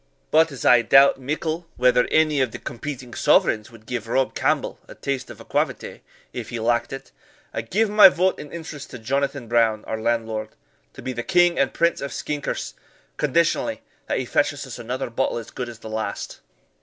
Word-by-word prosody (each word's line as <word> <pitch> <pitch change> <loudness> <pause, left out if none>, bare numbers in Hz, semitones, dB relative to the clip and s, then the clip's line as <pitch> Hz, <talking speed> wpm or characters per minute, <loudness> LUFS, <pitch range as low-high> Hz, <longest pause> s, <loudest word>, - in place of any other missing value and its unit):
But 160 0 +4
as 135 - -7
I 120 -1 +7
doubt 135 +4 +6
mickle 155 +5 -3
whether 125 0 +4
any 155 -3 +3
of 130 - +1
the - - -6
competing 125 -1 -7
sovereigns 105 -1 +3
would 115 -2 -16
give 115 -1 -4
Rob 130 +2 +1
Campbell - - 0
a - - -11
tass 135 -2 -3
of - - -10
aquavitae, - - -2 0.3
if - - -6
he 120 - -4
lacked 120 +1 +1
it, 135 - -8 0.4
I 115 - -2
give 205 - +1
my 210 -1 +9
vote 185 +1 +1
and 150 - -9
interest 160 -4 -8
to - - -8
Jonathan 135 +2 -2
Brown, 115 -2 +2
our 110 0 -4
landlord, 110 -2 -1 0.4
to - - -11
be 130 - -3
the 120 - -3
King 175 +4 +3
and 135 -1 +2
Prince 170 -1 +1
of 140 - -4
Skinkers, 145 - -3 0.4
conditionally - - +1 0.2
that - - 0
he - - -2
fetches - - 0
us - - -8
another 125 +1 -4
bottle 125 +1 0
as 115 - -7
good 125 -1 -5
as 115 - -10
the 110 - -11
last." 110 0 -4
130 Hz, 195 wpm, -23 LUFS, 115-150 Hz, 0.4 s, my